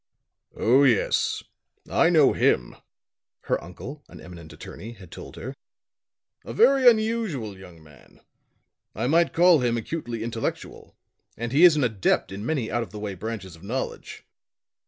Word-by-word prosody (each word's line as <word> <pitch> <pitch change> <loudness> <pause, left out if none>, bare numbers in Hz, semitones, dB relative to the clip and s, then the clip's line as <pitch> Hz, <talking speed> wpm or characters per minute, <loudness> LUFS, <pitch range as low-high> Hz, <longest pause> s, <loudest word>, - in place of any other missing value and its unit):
"Oh, 130 +5 +4
yes, 125 -7 +1 0.4
I - - +3
know - - +5
him," - - +1 0.7
her - - -2
uncle, 120 - -10
an - - -13
eminent 85 -3 -12
attorney, 105 +8 -10
had 95 -6 -15
told - - -10
her. 130 - -7 0.9
"A - - -7
very 275 - +6
unusual 215 - -1
young 90 -4 -14
man. 75 -4 -20 0.8
I 110 - -2
might 165 +5 +3
call 175 -1 +5
him 120 -2 0
acutely 120 -2 -5
intellectual, 115 -1 -5 0.4
and 115 +1 -4
he 145 +6 +4
is 175 -3 +8
an 150 - +1
adept 110 -6 0
in 100 +2 -6
many 125 -3 -2
out 120 - 0
of 115 - -6
the 105 - -10
way 105 -1 -4
branches 95 -2 -6
of 80 - -18
knowledge. 120 +7 -5
115 Hz, 155 wpm, -25 LUFS, 95-150 Hz, 0.9 s, is